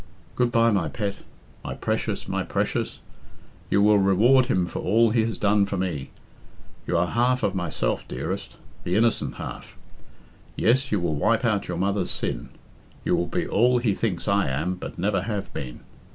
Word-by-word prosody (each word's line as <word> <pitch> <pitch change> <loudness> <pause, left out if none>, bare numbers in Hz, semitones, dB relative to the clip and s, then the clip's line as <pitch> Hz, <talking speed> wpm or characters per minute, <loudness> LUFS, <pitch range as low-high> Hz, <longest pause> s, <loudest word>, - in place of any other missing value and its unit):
Good 125 -1 +1
bye, 115 0 +4
my 100 -5 +1
pet! 100 -3 -3 0.5
My - - -5
precious, - - -2
my - - -1
precious! - - -2 0.7
You 100 - +3
will 105 0 +5
reward 115 +7 +4
him 95 -8 +2
for - - -5
all 115 +3 +3
he 115 -1 +3
has 115 - -3
done 100 -1 +3
for 100 - -3
me. 85 -8 -3 0.8
You 85 - +1
are 85 - +3
half 125 +6 +1
of 100 - +1
myself, 90 -4 -2
dearest 60 - -5 0.3
the 90 - -1
innocent 115 +1 +1
half. - - -8 0.8
Yes, 130 +4 +2
you 105 - +2
will 85 -3 -1
wipe 110 - +1
out 105 -4 +1
your 90 - -3
mother's 100 0 0
sin. - - -2 0.6
You - - +3
will 85 - 0
be - - -2
all 125 +4 +3
he 120 -4 +1
thinks 95 -5 -2
I 100 -6 +2
am, 75 +8 -1
but 90 - -8
never 95 +1 +1
have 100 0 -4
been. 60 -3 -6
100 Hz, 180 wpm, -25 LUFS, 90-115 Hz, 0.8 s, will